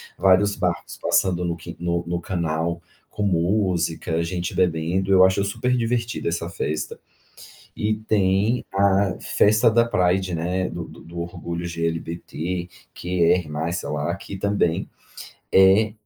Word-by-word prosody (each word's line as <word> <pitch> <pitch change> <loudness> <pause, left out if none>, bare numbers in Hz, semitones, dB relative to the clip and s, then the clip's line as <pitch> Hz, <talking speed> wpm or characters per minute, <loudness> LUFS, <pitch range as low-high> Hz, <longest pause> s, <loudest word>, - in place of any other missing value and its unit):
vários 100 +2 +4
barcos 85 -2 -2
passando 90 -2 +2
no 85 -1 -2
qui 85 +1 -9
no 85 0 -1
no 85 0 -2
canal 85 -1 -2 0.3
com 105 - -4
música, 85 -3 0
gente 85 0 -3
bebendo, 90 +2 0
eu 95 -1 +7
acho 95 +1 +2
superdivertida 120 0 -1
essa 85 0 -3
festa 75 -2 -3 0.8
e 110 +1 0
tem 105 +1 +1
a 100 -1 +3
festa 110 +2 +3
da 115 +1 +4
Pride, 90 -4 +1
né, 90 +3 -1
do 85 0 -5
do 85 +1 -11
orgulho 85 0 -5
LGBTQR+, 85 0 -2
sei 85 - -3
lá, 75 +3 -1
que 100 - -8
também 95 -4 0 0.6
é 95 +3 +5
90 Hz, 125 wpm, -23 LUFS, 85-100 Hz, 0.8 s, eu